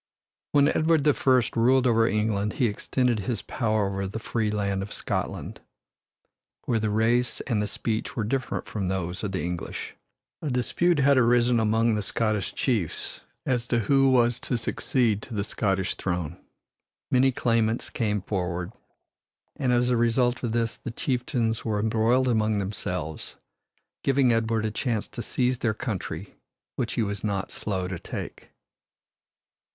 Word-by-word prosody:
When 145 -1 +5
Edward 155 0 +3
the 150 0 +5
First 130 -5 +2
ruled 125 +3 +4
over 115 -2 +4
England 105 -1 0
he 125 - +1
extended 120 +2 0
his 110 +4 -2
power 110 -4 0
over 100 0 -2
the 100 - -5
free 110 -1 -1
land 100 -2 -1
of 100 - -6
Scotland, - - -4 1.0
where 115 - +1
the 110 0 0
race 115 +3 +1
and 115 -5 0
the 105 - -1
speech 110 +2 -3
were 110 - -1
different 130 +4 -2
from 100 -4 -3
those 90 0 -2
of 100 - -2
the 95 - -2
English. 85 0 -4 0.5
A 155 - -2
dispute 155 +7 +1
had 140 -1 +5
arisen 120 0 +4
among 110 +1 +2
the 105 - 0
Scottish 105 +1 -1
chiefs 110 - -1 0.2
as 120 -2 0
to 120 - +1
who 135 +5 +4
was 120 -1 +3
to 125 - -1
succeed 115 -1 +1
to 115 - -8
the 100 - 0
Scottish 95 -3 0
throne. 90 -3 -3 0.8
Many 130 +1 +4
claimants 115 -2 0
came 105 -4 -1
forward, 90 -2 -2 0.8
and 130 -3 0
as 125 0 +3
a 120 - +3
result 120 +2 +2
of 120 - -2
this 115 0 0
the - - -6
chieftains 120 -2 -1
were 105 -2 -1
embroiled 115 +4 +2
among 110 -3 +2
themselves, 90 -5 -4 0.7
giving 135 -3 +3
Edward 115 -1 +1
a 110 - -1
chance 110 -1 -1
to - - -6
seize 125 +1 0
their 110 -3 0
country 100 -6 -4 0.4
which 115 - -2
he 115 - +1
was 100 -1 -3
not 100 -2 -2
slow 95 -3 -3
to 90 -2 -5
take. - - -7
115 Hz, 160 wpm, -26 LUFS, 105-125 Hz, 1.0 s, When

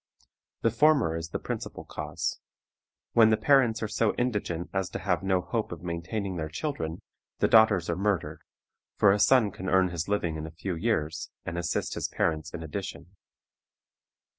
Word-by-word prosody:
The 115 - +3
former 140 - +3
is 80 0 -4
the - - -2
principal - - -6
cause. - - -4 0.7
When 110 -1 +7
the 110 - +3
parents 120 -5 +3
are - - 0
so 105 +1 +1
indigent 105 -8 -2
as 95 -2 -1
to - - -4
have 95 -2 0
no 95 -1 +1
hope 110 +5 -3
of 85 -1 -7
maintaining 90 +3 -3
their 80 -1 -3
children, 80 - -4 0.3
the - - +3
daughters 110 -6 +5
are 85 - 0
murdered, 95 -5 -1 0.5
for 100 - +5
a 100 - +2
son 115 -3 +5
can 90 0 -5
earn 95 0 +4
his 85 -2 -3
living 85 -6 0
in 80 0 -5
a 80 +1 -13
few 95 +1 -3
years, 80 -4 -1 0.2
and 85 - -4
assist 85 -1 -1
his - - -2
parents 80 -1 -1
in 80 - -6
addition. 95 +3 -6
95 Hz, 175 wpm, -28 LUFS, 85-110 Hz, 0.7 s, When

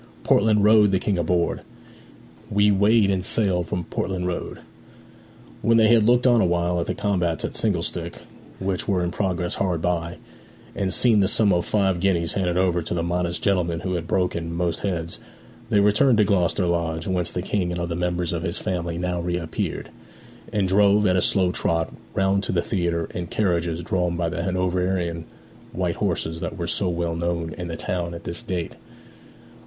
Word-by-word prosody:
Portland 105 0 +3
Road 105 -1 +6
the 95 - +2
King 95 0 -1
aboard, 85 0 0 0.9
We 105 +1 +3
weighed 100 +1 +4
and 95 -1 -1
sailed 95 -5 0
from 90 - -3
Portland 90 +2 -3
Road!' 90 -1 -4 1.0
When 115 0 +3
they 110 -1 +5
had 115 -1 +6
looked 120 +4 +3
on 120 -3 +5
awhile 85 -1 +1
at 85 - -2
the - - -2
combats 90 -5 -1
at - - -5
single 95 -7 0
stick 85 -1 -4 0.4
which 95 -1 -2
were 95 -3 +1
in 85 - -2
progress 90 -2 -1
hard 90 -4 -1
by, 85 0 -2 0.6
and 95 -2 -1
seen 115 +2 +4
the 95 - +3
sum 105 -1 +3
of 85 -1 0
five 95 -4 +1
guineas 85 -3 +1
handed 90 -2 0
over 90 -2 +2
to 85 - -3
the 85 - -1
modest 85 0 -1
gentleman 85 -4 +1
who 95 - -2
had 85 -2 -3
broken 85 -3 -1
most 85 0 -1
heads, 85 -4 -3 0.5
they 105 - +3
returned 105 +5 +4
to 105 - +5
Gloucester 95 -2 +1
Lodge, 85 -1 -1
whence 90 -3 -1
the 90 - -3
King 95 -3 -1
and 85 - -3
other 85 -1 -3
members 90 0 -1
of 85 - -2
his 85 -1 -2
family 85 -2 -3
now 90 0 -2
reappeared, 85 -1 -3 0.6
and 100 -3 +1
drove, 100 +2 +4
at 90 -2 +3
a 90 - +3
slow 95 -1 +2
trot, 80 -2 -1 0.2
round 95 +1 +2
to - - -3
the 85 -2 0
theatre 85 -3 -1
in 90 -1 -4
carriages 85 -4 -1
drawn 90 0 -1
by 85 -1 0
the 85 0 -3
Hanoverian 90 -2 -1 0.5
white - - -2
horses 80 +1 -2
that - - -5
were 85 - -3
so 90 +2 0
well 85 -1 -2
known 85 -1 -2
in 90 -2 -6
the 85 -1 -5
town 85 -1 -3
at 85 - -9
this 85 - -5
date. 90 -3 -4
90 Hz, 190 wpm, -23 LUFS, 85-95 Hz, 1.0 s, Road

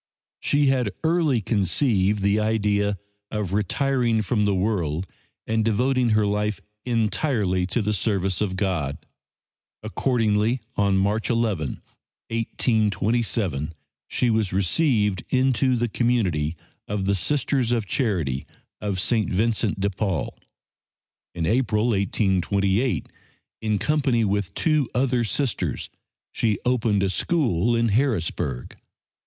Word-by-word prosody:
She 145 0 +2
had 130 -5 +2
early 160 -7 +2
conceived 100 - +1
the 100 +1 +3
idea 105 -2 +1 0.3
of 105 -4 -3
retiring 115 +2 +1
from 105 0 +1
the 100 -1 +2
world 90 -4 -1 0.4
and 110 0 0
devoting 125 +3 +2
her 105 - +3
life 105 0 -1 0.3
entirely 110 -5 0
to 115 +4 -1
the 105 +1 0
service 95 -3 0
of 95 -3 -1
God. 85 -8 -1 0.9
Accordingly, 110 0 +1 0.2
on 100 -1 +2
March 105 +3 0
11, 105 - -1 0.5
1827, 110 - 0 0.3
she 120 - +1
was 110 -4 +1
received 105 - +1
into 130 -1 +2
the 120 0 0
community 95 -10 0 0.3
of 100 -1 -2
the 100 - +2
Sisters 130 +3 +1
of 115 -3 0
Charity 85 - -1 0.4
of 100 -3 -2
St. 110 +3 +1
Vincent 110 +1 0
de 100 +1 0
Paul. 95 -3 -2 1.0
In 85 -2 -1
April, 115 +1 +1
1828, 100 +2 +1 0.5
in 110 -1 0
company 135 -3 +1
with 100 -2 -1
two 155 -5 +1
other 125 -1 +2
Sisters, 110 - -2 0.4
she 110 -3 0
opened 115 -5 +2
a 95 - +1
school 120 - +1
in 115 0 +2
Harrisburg. 100 - -1
105 Hz, 115 wpm, -24 LUFS, 95-120 Hz, 1.0 s, the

